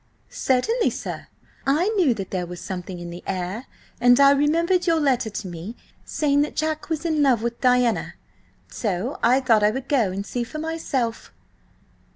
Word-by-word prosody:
"Certainly, 355 - +1
sir. - - -6 0.4
I 310 +9 +2
knew 360 - +2
that 195 -3 -6
there 180 -2 -2
was 175 0 -8
something 180 -1 -6
in 175 0 -7
the 175 - -9
air, 190 +7 -4 0.3
and 245 +1 +5
I 280 0 +7
remembered 335 +6 +2
your 330 -1 +3
letter 265 -6 +1
to 205 -1 -6
me 175 +6 -7 0.3
saying 285 -2 +1
that 295 - -2
Jack 310 0 -2
was 320 0 -2
in 315 -3 +1
love 255 -6 +3
with 235 0 -3
Diana. 250 -3 +2 0.5
So 210 +4 -3
I 250 +3 +4
thought 230 -5 +3
I 210 - +5
would 265 +4 -4
go 235 -10 +2
and 195 +2 -4
see 245 - -3
her 235 - -5
for 310 - -6
myself." 305 -7 -3
250 Hz, 185 wpm, -23 LUFS, 210-300 Hz, 0.5 s, I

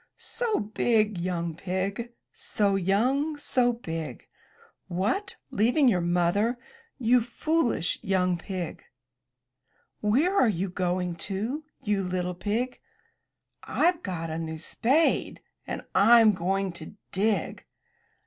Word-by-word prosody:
'* - - -54
''So 440 - -1
big, 215 -6 +2
young 170 -2 -2
pig, 195 +6 -3 0.2
So 200 -2 0
young, 250 - +1
so 250 -4 +2
big! 165 - -6 0.6
What! 205 - -1
leaving 245 +7 +3
your 185 -7 +3
Mother, 175 +7 +1 0.4
you 245 -1 +4
foolish 245 - 0
young 185 -2 +1
pig!" 180 -3 -5 1.2
"Where 275 - +2
are 255 - +5
you 190 -1 -1
going 180 -1 -1
to, 230 +11 -3 0.2
you 205 -2 0
little 180 0 -2
pig?'* 220 +8 -2 0.8
"Fve 350 0 +1
got 165 - -4
a 160 - -3
new 160 -1 -4
spade, 260 - +1 0.3
and - - -4
Fm 225 +1 +7
going 190 +1 -1
to 170 +2 -10 0.2
dig. 205 +3 0
200 Hz, 115 wpm, -27 LUFS, 180-245 Hz, 1.2 s, Fm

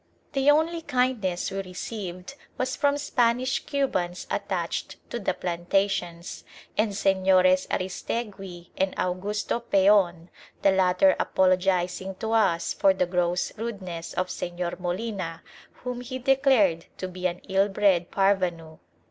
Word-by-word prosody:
The 275 +1 +3
only 320 +3 +3
kindness 250 - 0
we 195 0 -2
received 185 +1 -6 0.2
was 255 0 -1
from 285 -1 +2
Spanish 250 -2 +1
Cubans 185 -11 -1
attached - - -2 0.2
to 240 - -3
the 200 - -1
plantations, 175 0 -2 0.3
and 215 -1 +1
Señores 190 -2 +3
Aristegui 190 -2 -4
and 190 0 0
Augusto 200 +5 -1
Peon, 190 -6 +3 0.3
the 195 - +6
latter 190 +9 +4
apologising 185 0 +1
to 220 +4 -4
us 210 -7 +2
for 195 -1 +3
the 180 - +1
gross 180 0 0
rudeness 185 -7 -5
of 185 0 -1
Señor 175 0 -4
Molina, 180 -2 -4 0.4
whom 250 -1 -4
he 255 +1 -5
declared 260 - +3
to 185 - -4
be 185 0 -2
an 180 0 -5
ill 195 +1 +2
bred 195 -3 +2
parvenu. 180 -5 0
190 Hz, 125 wpm, -26 LUFS, 180-230 Hz, 0.4 s, the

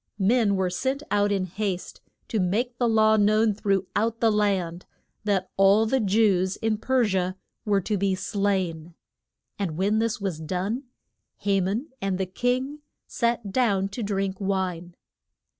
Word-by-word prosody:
Men 210 0 +3
were 190 -1 0
sent 265 +10 -2
out 205 0 +2
in 195 -2 0
haste 190 0 -4 0.3
to 220 - 0
make 230 +7 -1
the 240 -2 +2
law 220 -1 +4
known 215 +1 +3
through 195 -2 0
out 225 +2 0
the 225 -1 +3
land, 190 -5 0 0.4
that 195 -3 0
all 195 +3 +5
the 265 +4 +1
Jews 195 -3 +2
in 220 -1 -1
Per 255 0 +2
si 190 -2 0
a 185 +1 -2 0.3
were 200 -2 +2
to 205 +2 -1
be 195 -1 +1
slain. 185 -5 -2 0.6
And 170 -6 -2
when 205 +4 +2
this 230 +1 0
was 190 -6 -3
done 190 - -3 0.6
Ha 195 -1 +2
man 210 - -2
and 195 -1 -1
the 190 - -1
king 250 +9 -1 0.3
sat 235 -4 -1
down 200 -5 +1
to 215 +5 -6
drink 195 -2 -1
wine. 185 -3 -2
200 Hz, 160 wpm, -25 LUFS, 190-225 Hz, 0.6 s, all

